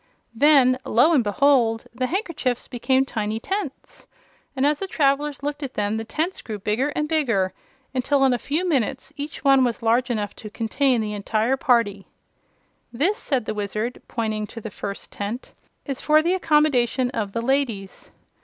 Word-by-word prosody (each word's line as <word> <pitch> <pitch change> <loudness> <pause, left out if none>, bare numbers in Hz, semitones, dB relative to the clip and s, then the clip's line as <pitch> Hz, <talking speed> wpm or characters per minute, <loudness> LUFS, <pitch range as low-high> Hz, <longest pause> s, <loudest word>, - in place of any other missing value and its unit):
Then, 260 0 +5
lo 245 +9 +4
and 270 -6 +4
behold! 230 0 +2
the 255 +1 -1
handkerchiefs 320 - -2
became 260 +2 +1
tiny 220 -4 -2
tents, 385 - -5 0.5
and 265 +1 +1
as 295 0 +2
the 390 - -3
travelers 285 -3 0
looked 290 +1 -3
at 270 -3 -5
them 205 0 0
the 225 - -3
tents 320 +11 -2
grew 215 -2 -6
bigger 215 +8 0
and 300 - 0
bigger 235 - +1 0.4
until 270 +2 +2
in 260 - +4
a 245 - -1
few 320 +9 -1
minutes 270 -4 -1
each 290 +1 -6
one 270 -1 +5
was 240 -1 -1
large 240 +3 +2
enough 210 -4 -2
to 215 - -8
contain 235 +3 +1
the 210 -1 -3
entire 215 +4 0
party. 230 -7 +1 0.8
"This," 345 - 0
said 265 - -1
the - - -2
Wizard, 215 +3 -3
pointing 215 -2 -2
to 230 - -9
the 220 -1 -7
first 200 +1 -7
tent, 210 +5 -5 0.3
"is 275 -3 -4
for 310 0 +4
the 345 +2 +2
accommodation 285 -7 +2
of 205 -5 -3
the 230 - -1
ladies. 235 -7 -1
255 Hz, 175 wpm, -23 LUFS, 220-285 Hz, 0.8 s, Then